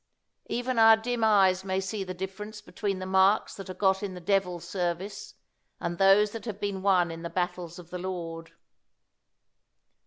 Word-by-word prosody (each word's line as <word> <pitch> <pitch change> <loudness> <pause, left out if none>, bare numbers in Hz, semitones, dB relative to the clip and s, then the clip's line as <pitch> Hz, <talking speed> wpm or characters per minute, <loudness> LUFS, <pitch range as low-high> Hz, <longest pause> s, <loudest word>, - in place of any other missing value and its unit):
Even 245 0 -1
our 225 0 +8
dim 235 +1 -2
eyes 190 -4 +4
may 190 0 -1
see 195 +1 -3
the 185 -1 -6
difference 195 +4 -6
between 200 0 -3
the 185 - -5
marks 190 +2 +3
that 195 -1 -9
are 185 - -6
got 190 0 +2
in 195 -3 -4
the - - -7
devil's 180 -2 0
service 190 - -4 0.4
and 170 0 -4
those 195 +2 +5
that 225 +1 -7
have 210 -3 -5
been 200 -2 -3
won 185 -3 +3
in 165 0 -7
the 170 - -5
battles 175 -1 -3
of 175 -1 -12
the 180 - -4
Lord. 170 -3 -5
190 Hz, 180 wpm, -28 LUFS, 180-210 Hz, 0.4 s, our